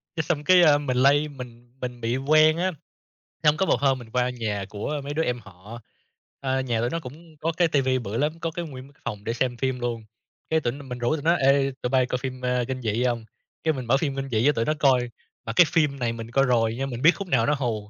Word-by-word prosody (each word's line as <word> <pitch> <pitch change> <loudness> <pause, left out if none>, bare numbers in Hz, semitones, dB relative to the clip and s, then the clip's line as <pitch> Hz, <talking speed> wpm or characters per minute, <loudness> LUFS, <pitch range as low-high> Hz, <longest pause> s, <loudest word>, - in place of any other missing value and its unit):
Cái, 160 - -1
xong 150 -2 -1
cái, 185 +2 +6
a, 150 -3 +6
mình 135 -4 -2
lây 140 +3 +4
mình 125 -3 -11
mình 125 -1 -5
bị 115 +3 0
quen 155 +3 +4
á, 185 +2 0 0.7
xong 150 0 +4
có 190 - +2
một 120 - +2
hôm 135 -2 +2
mình 115 -2 -12
qua 125 +1 +1
nhà 110 -5 -3
của 140 +8 -4
mấy 145 - -5
đứa 160 +2 0
em 125 -3 -1
họ, 105 +3 -12 0.6
ơ, 130 -1 -1
nhà 120 -3 -1
tụi 120 - 0
nó 165 - -2
cũng 155 +4 -12
có 165 +3 -1
cái 175 -2 +4
TV 140 -4 +1 0.2
bự 105 +3 -4
lắm, 155 +4 -1
có 165 - -2
cái 170 +1 -5
nguyên 135 -1 -10
cái - - -32
phòng 105 -1 -5
để 115 - -2
xem 120 0 -1
phim 130 -1 -1
luôn, 120 -2 -3 0.5
cái 160 0 +3
tỉnh 130 +1 -2
mình 125 0 -5
rủ 120 +6 +1
tụi 145 - -5
nó 170 - +4
"Ê, 135 -1 +3
tụi 125 - -1
bây 130 -1 +3
coi 125 - -2
phim, 130 0 -6
a, 125 0 +1
kinh 130 -1 -4
dị 115 +1 0
hông?" 120 -3 -1 0.4
Cái 160 -1 +2
mình 130 -3 -5
mở 130 +4 +3
phim 140 -2 -2
kinh 135 0 -4
dị 110 -1 +1
cho 145 - +6
tụi 115 -4 -1
nó 155 - +1
coi, 125 -3 +3 0.4
mà 115 - -3
cái 175 - +8
phim 150 -4 +1
này 120 -1 -1
mình 115 0 -8
coi 135 +2 +3
rồi 115 -2 +2
nhưng 135 +1 -2
mình 120 -1 -5
biết 165 - +7
khúc 200 - -6
nào 125 -8 +2
nó 150 - +2
hù, 110 -5 -3
130 Hz, 270 wpm, -25 LUFS, 120-150 Hz, 0.7 s, cái